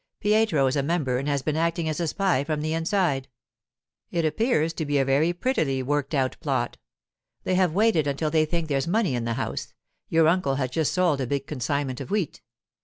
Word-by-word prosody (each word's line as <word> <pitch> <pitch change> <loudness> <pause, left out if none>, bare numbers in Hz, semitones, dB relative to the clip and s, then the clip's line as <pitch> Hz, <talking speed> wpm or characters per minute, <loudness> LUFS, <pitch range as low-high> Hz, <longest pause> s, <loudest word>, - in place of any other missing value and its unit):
Pietro 210 -9 +3
is 130 +2 +1
a 140 - +2
member 140 -4 0
and 140 - -4
has 140 -2 0
been 155 - -1
acting 165 0 0
as 155 +1 -2
a 170 - 0
spy 180 -6 +1
from 150 0 -2
the 155 +1 -1
inside. 165 -5 0 0.8
It 170 -2 0
appears 165 - +1
to 160 - -3
be 145 0 +1
a 135 - +2
very 140 +5 +3
prettily 160 - 0
worked 145 +2 -1
out 130 -2 0
plot. - - -1 0.7
They - - 0
have 180 -3 +2
waited 205 -8 +3
until 145 +2 -1
they 155 0 +3
think 165 +1 -2
there's 140 0 0
money 195 - +1
in 120 -2 -2
the 115 - -1
house; 130 - -4 0.3
your 160 -1 +4
uncle 165 -5 +2
has 130 -2 -2
just 155 +2 0
sold 175 -7 +2
a 130 - -2
big 140 +1 -2
consignment 135 -1 -2
of - - -7
wheat. 200 -6 -2
155 Hz, 210 wpm, -25 LUFS, 135-170 Hz, 0.8 s, your